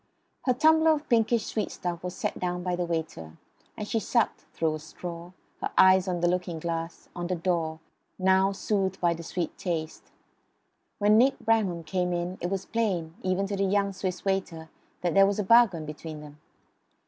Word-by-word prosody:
Her 255 Hz, -, +4 dB
tumbler 315 Hz, +3 st, +5 dB
of 300 Hz, -1 st, -4 dB
pinkish 230 Hz, -1 st, +3 dB
sweet 215 Hz, -, -2 dB
stuff 175 Hz, -1 st, -5 dB
was 180 Hz, 0 st, -4 dB
set -, -, -3 dB
down 180 Hz, 0 st, -2 dB
by 180 Hz, -1 st, -1 dB
the 175 Hz, 0 st, -1 dB
waiter; 160 Hz, -, -4 dB, 0.4 s
and 210 Hz, -, -4 dB
she 225 Hz, -, 0 dB
sucked, 230 Hz, +1 st, 0 dB
through 160 Hz, -1 st, 0 dB
a 155 Hz, -, -4 dB
straw, 170 Hz, +2 st, -8 dB, 0.3 s
her -, -, -1 dB
eyes 190 Hz, 0 st, +6 dB
on 175 Hz, -2 st, -1 dB
the 175 Hz, -, +3 dB
looking 180 Hz, -1 st, -1 dB
glass, 165 Hz, +1 st, -4 dB
on 175 Hz, 0 st, -3 dB
the 185 Hz, -, -1 dB
door, 165 Hz, -2 st, -1 dB, 0.4 s
now 190 Hz, +1 st, +3 dB
soothed 195 Hz, -1 st, -1 dB
by 170 Hz, -1 st, +2 dB
the 170 Hz, -, -7 dB
sweet 170 Hz, 0 st, -4 dB
taste. 160 Hz, -3 st, -3 dB, 0.9 s
When 210 Hz, +1 st, +5 dB
Nick 265 Hz, +3 st, +4 dB
Bramham 220 Hz, -8 st, +1 dB
came 180 Hz, +2 st, -1 dB
in 175 Hz, +2 st, -3 dB
it 175 Hz, -, -1 dB
was 195 Hz, 0 st, -3 dB
plain, 185 Hz, -8 st, -1 dB
even 185 Hz, +1 st, 0 dB
to 200 Hz, 0 st, -3 dB
the 195 Hz, -, 0 dB
young 200 Hz, 0 st, +1 dB
Swiss 185 Hz, -1 st, -4 dB
waiter, 185 Hz, -5 st, -2 dB, 0.3 s
that 175 Hz, -1 st, 0 dB
there 195 Hz, 0 st, +6 dB
was 200 Hz, -, 0 dB
a 210 Hz, -, 0 dB
bargain 195 Hz, -6 st, +5 dB
between 155 Hz, 0 st, -7 dB
them. 150 Hz, 0 st, -12 dB
180 Hz, 190 wpm, -27 LUFS, 170-200 Hz, 0.9 s, eyes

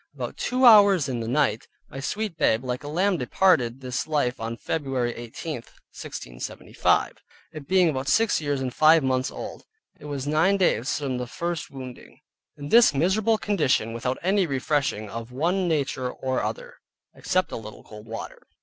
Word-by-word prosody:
About -, -, -5 dB
two 255 Hz, +1 st, +1 dB
hours 200 Hz, -, +7 dB
in 125 Hz, -3 st, -3 dB
the 115 Hz, -, -4 dB
night, 130 Hz, -2 st, 0 dB, 0.2 s
my 135 Hz, -, -8 dB
sweet 210 Hz, +6 st, -3 dB
babe 115 Hz, -5 st, +2 dB
like 125 Hz, +1 st, -4 dB
a -, -, -7 dB
lamb 180 Hz, +5 st, +1 dB
departed 125 Hz, -3 st, +2 dB
this 125 Hz, +1 st, -3 dB
life 145 Hz, -5 st, 0 dB
on 115 Hz, +1 st, -4 dB
Feb. 150 Hz, +2 st, -3 dB, 0.3 s
18, 120 Hz, +7 st, -6 dB
1675. 60 Hz, -, -3 dB, 0.4 s
It 155 Hz, -3 st, -9 dB
being 185 Hz, -2 st, +4 dB
about 135 Hz, -3 st, -2 dB
six 220 Hz, +5 st, +2 dB
years, 145 Hz, -2 st, -1 dB
and 130 Hz, -2 st, -3 dB
five 155 Hz, 0 st, +5 dB
months 130 Hz, 0 st, 0 dB
old. -, -, -8 dB, 0.4 s
It -, -, -12 dB
was 140 Hz, -2 st, -4 dB
nine 160 Hz, +7 st, +2 dB
days 140 Hz, -, +1 dB
from 135 Hz, -4 st, -3 dB
the 125 Hz, -, -4 dB
first 170 Hz, +4 st, -4 dB
wounding, 130 Hz, -2 st, -10 dB, 0.4 s
in 145 Hz, 0 st, -7 dB
this 230 Hz, -7 st, +6 dB
miserable 205 Hz, +9 st, +2 dB
condition, 150 Hz, -, 0 dB
without 125 Hz, +2 st, -2 dB
any 190 Hz, 0 st, +2 dB
refreshing 135 Hz, -5 st, -1 dB
of 115 Hz, +3 st, -7 dB
one 175 Hz, +8 st, 0 dB
nature 140 Hz, -5 st, -1 dB
or 130 Hz, 0 st, -2 dB
other, -, -, -5 dB, 0.4 s
except 185 Hz, 0 st, -1 dB
a -, -, -4 dB
little 110 Hz, -1 st, -9 dB
cold 105 Hz, 0 st, -12 dB
water. 115 Hz, 0 st, -8 dB
145 Hz, 170 wpm, -25 LUFS, 125-180 Hz, 0.4 s, hours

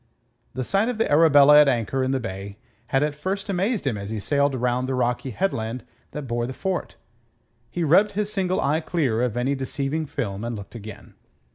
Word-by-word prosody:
The 130 Hz, -, -2 dB
sight 200 Hz, -, +1 dB
of 245 Hz, -, -3 dB
the 225 Hz, -, +1 dB
Arabella 150 Hz, -1 st, +7 dB
at 150 Hz, -, +4 dB
anchor 130 Hz, +1 st, 0 dB
in 130 Hz, -, 0 dB
the 135 Hz, 0 st, 0 dB
bay 100 Hz, -2 st, -6 dB, 0.3 s
had 135 Hz, +3 st, +1 dB
at 150 Hz, -1 st, 0 dB
first 195 Hz, +7 st, -4 dB
amazed 195 Hz, -, 0 dB
him 115 Hz, -7 st, -1 dB
as 100 Hz, 0 st, -6 dB
he 110 Hz, -1 st, -3 dB
sailed 140 Hz, +5 st, +1 dB
round 125 Hz, +1 st, 0 dB
the 130 Hz, -, 0 dB
rocky 125 Hz, +1 st, -1 dB
headland 125 Hz, -, -2 dB, 0.3 s
that 150 Hz, -, -6 dB
bore 120 Hz, -2 st, -2 dB
the 130 Hz, -, -5 dB
fort. 190 Hz, +6 st, -3 dB, 0.7 s
He 175 Hz, -, -3 dB
rubbed 185 Hz, +7 st, +4 dB
his 210 Hz, +1 st, -2 dB
single 185 Hz, -2 st, 0 dB
eye 150 Hz, +3 st, +1 dB
clear 145 Hz, -9 st, 0 dB
of 120 Hz, -2 st, -1 dB
any 130 Hz, +3 st, +1 dB
deceiving 140 Hz, +3 st, -3 dB
film 105 Hz, -7 st, -4 dB
and 120 Hz, 0 st, -3 dB
looked 100 Hz, -2 st, -9 dB
again. 105 Hz, -2 st, -10 dB
135 Hz, 205 wpm, -24 LUFS, 120-165 Hz, 0.7 s, Arabella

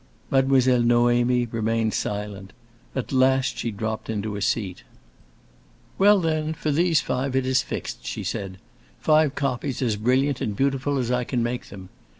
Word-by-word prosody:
Mademoiselle 130 Hz, -2 st, +4 dB
Noémie 120 Hz, +1 st, +3 dB
remained 115 Hz, 0 st, 0 dB
silent; 100 Hz, -2 st, -4 dB, 0.4 s
at 130 Hz, -, -3 dB
last 130 Hz, 0 st, +2 dB
she 120 Hz, -, -2 dB
dropped 110 Hz, +1 st, -4 dB
into 105 Hz, -1 st, -3 dB
a 100 Hz, -, -5 dB
seat. 95 Hz, -3 st, -1 dB, 1.2 s
"Well 205 Hz, +1 st, +6 dB
then, 160 Hz, -2 st, -1 dB
for 155 Hz, -1 st, -2 dB
those 165 Hz, 0 st, +3 dB
five 130 Hz, +1 st, -2 dB
it 130 Hz, -1 st, +1 dB
is 130 Hz, 0 st, +2 dB
fixed," -, -, -6 dB
she -, -, -5 dB
said. 95 Hz, -1 st, -4 dB, 0.4 s
"Five 155 Hz, -2 st, +3 dB
copies 135 Hz, -1 st, -2 dB
as 115 Hz, -5 st, 0 dB
brilliant 130 Hz, +5 st, +1 dB
and 105 Hz, -, -2 dB
beautiful 135 Hz, +3 st, 0 dB
as 125 Hz, -2 st, -1 dB
I 125 Hz, 0 st, +1 dB
can 120 Hz, -1 st, -1 dB
make 120 Hz, +1 st, -3 dB
them. 95 Hz, -2 st, -10 dB
125 Hz, 155 wpm, -24 LUFS, 110-135 Hz, 1.2 s, Well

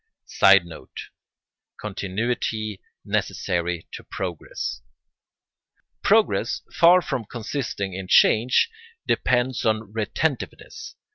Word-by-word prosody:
[Sidenote: 85 Hz, -4 st, +2 dB, 0.7 s
Continuity 105 Hz, +1 st, -3 dB, 0.2 s
necessary 85 Hz, -2 st, -2 dB
to -, -, -8 dB
progress.] 85 Hz, -8 st, -5 dB, 1.2 s
Progress, -, -, +2 dB
far 175 Hz, +2 st, +6 dB
from 125 Hz, -, -3 dB
consisting 110 Hz, -3 st, -4 dB
in 95 Hz, 0 st, -6 dB
change, 120 Hz, -, +4 dB, 0.3 s
depends 125 Hz, 0 st, +1 dB
on 110 Hz, -2 st, 0 dB
retentiveness. 120 Hz, +6 st, -3 dB
110 Hz, 75 wpm, -24 LUFS, 95-125 Hz, 1.2 s, far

